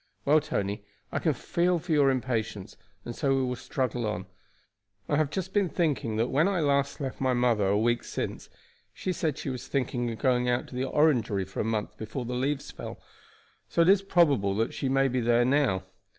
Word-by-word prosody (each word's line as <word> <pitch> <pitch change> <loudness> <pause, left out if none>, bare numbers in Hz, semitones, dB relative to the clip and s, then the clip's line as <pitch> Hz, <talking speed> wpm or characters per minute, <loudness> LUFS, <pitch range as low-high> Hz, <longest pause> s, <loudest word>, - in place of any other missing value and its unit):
"Well, 150 +2 +5
Tony, 100 -6 -3 0.3
I - - -1
can - - +1
feel 175 +1 +1
for 165 +1 -6
your 145 -3 +5
impatience, 115 -6 -2 0.3
and 120 - -5
so 135 -1 +1
we 135 - +1
will 125 0 -1
struggle 125 -2 -2
on. 105 -3 -3 0.8
I 145 - +1
have 155 -1 +2
just 190 +4 -4
been 200 -4 +2
thinking 150 -11 0
that 115 +3 0
when 150 +7 +3
I 195 -3 +1
last 140 -2 +1
left 135 -2 -5
my 130 -1 +2
mother 120 -5 +2
a 100 +1 +2
week 120 +2 +1
since - - -5 0.5
she 185 - -2
said 155 -4 -1
she 135 - -4
was 125 -2 -6
thinking 125 -3 -1
of 115 - -5
going 125 -1 +2
out 120 0 0
to - - -10
the 130 +1 -1
Orangery 120 -11 +2
for 95 - -8
a - - +1
month 110 -1 -2
before 110 +4 -5
the 125 - -4
leaves 135 +3 -2
fell, - - -8 0.7
so 170 - +3
it 170 - +3
is 195 0 +6
probable 145 - +3
that 115 +3 0
she 135 - -2
may 135 +1 +3
be 130 -1 0
there 120 +1 +3
now. 130 -8 +2
130 Hz, 210 wpm, -28 LUFS, 115-145 Hz, 0.8 s, is